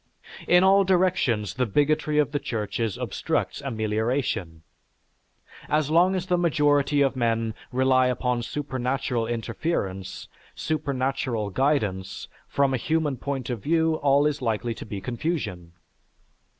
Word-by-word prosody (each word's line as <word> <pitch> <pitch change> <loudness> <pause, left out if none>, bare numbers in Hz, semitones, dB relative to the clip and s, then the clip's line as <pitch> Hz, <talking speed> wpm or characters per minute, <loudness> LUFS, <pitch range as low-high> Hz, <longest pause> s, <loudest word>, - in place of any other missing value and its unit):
In 180 +1 +6
all 195 +1 +6
directions 175 - +1
the 125 +3 0
bigotry 150 +5 +1
of 150 -1 +2
the 145 - -1
churches 115 -5 -3
obstructs - - -2
amelioration... 110 - -2 1.1
as 150 -1 +1
long 180 +4 +4
as 180 -1 -2
the 180 -1 +1
majority 145 -3 +2
of 135 -1 +1
men 115 -2 0 0.2
rely 130 0 +3
upon 125 -1 0
supernatural 130 -2 -2
interference, 115 - -3 0.3
supernatural 135 -7 -2
guidance, 105 -8 -1 0.2
from 140 -1 +1
a - - +2
human 155 +2 0
point 135 -3 -4
of 115 -4 -4
view 160 +2 +2
all 140 0 +3
is 150 -2 0
likely 115 0 -1
to 110 - -9
be 100 -2 -5
confusion.... 120 - -3
130 Hz, 125 wpm, -25 LUFS, 115-150 Hz, 1.1 s, In